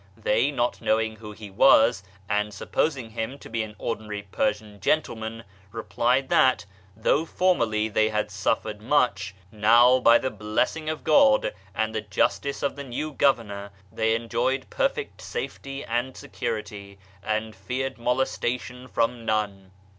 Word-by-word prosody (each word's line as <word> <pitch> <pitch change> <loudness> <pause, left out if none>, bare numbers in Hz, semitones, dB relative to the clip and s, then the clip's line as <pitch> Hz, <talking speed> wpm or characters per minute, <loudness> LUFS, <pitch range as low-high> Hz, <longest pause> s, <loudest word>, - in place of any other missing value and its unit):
They, 110 +4 +2
not 125 -4 -1
knowing 110 0 +1
who 105 -1 -9
he 105 -1 -10
was, 110 +1 +5 0.3
and 105 0 0
supposing 125 +4 -2
him 115 +4 -4
to - - -12
be 115 0 -1
an 105 -1 -6
ordinary 105 -2 -4
Persian 105 +1 -2
gentleman, 115 -3 -1 0.3
replied 120 +4 0
that, 130 -5 +4 0.3
though 135 +7 +2
formerly 115 -12 +1
they 110 0 +2
had 105 -1 -1
suffered 105 +2 -1
much, 110 -6 +1 0.2
now, 120 +4 +5
by 115 -1 +6
the 130 - -2
blessing 125 +9 -1
of 155 - -4
God 275 -2 +4 0.2
and 110 0 -1
the 110 - -1
justice 125 +6 -1
of 140 - 0
the 140 - -6
new 140 +4 -4
governor, 105 -8 +1 0.2
they 110 0 +1
enjoyed 125 +3 -1
perfect - - -1
safety 140 - -6
and 120 +3 -2
security, 105 -4 -5 0.2
and 110 +1 -2
feared 125 +7 -4
molestation 125 0 -2
from 120 -1 -1
none. 105 -3 -2
115 Hz, 140 wpm, -25 LUFS, 105-130 Hz, 0.3 s, by